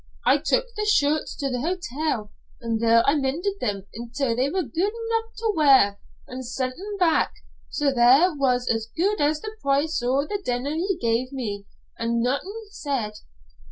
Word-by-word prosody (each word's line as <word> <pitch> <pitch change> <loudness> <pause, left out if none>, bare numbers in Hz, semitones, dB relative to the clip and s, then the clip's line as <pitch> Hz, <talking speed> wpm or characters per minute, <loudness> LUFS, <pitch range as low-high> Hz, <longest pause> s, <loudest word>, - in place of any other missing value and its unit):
I 290 - +5
took - - +1
the 425 0 -2
shirts 305 -6 +1
to 275 -2 -2
the 250 -1 -2
hotel, 310 - -2 0.3
an' 230 -3 -2
there 230 0 +5
I 280 - +5
mended 315 +8 -1
them 200 -4 -2
until 235 +2 -2
they 260 +3 +1
were 370 +3 0
guid 335 - -1
enough 455 0 -3
to 445 -1 0
wear, 265 -10 +5 0.3
an' 255 +1 -6
sent 255 +1 -3
them 405 +4 -6
back. 345 -4 +3 0.4
So 290 -2 +1
there 265 +8 +5
was 255 -4 +1
as 225 0 0
guid 395 +2 +1
as 300 +1 +2
the 430 0 -7
price 280 +2 +1
o' 260 +4 +1
the 405 +5 -4
denner 250 +2 -1
he 360 +3 -1
gave 235 +1 0
me, 205 -7 -5 0.3
an' 230 0 0
naethin 395 - -3
said. 270 - -2
280 Hz, 175 wpm, -24 LUFS, 245-360 Hz, 0.4 s, I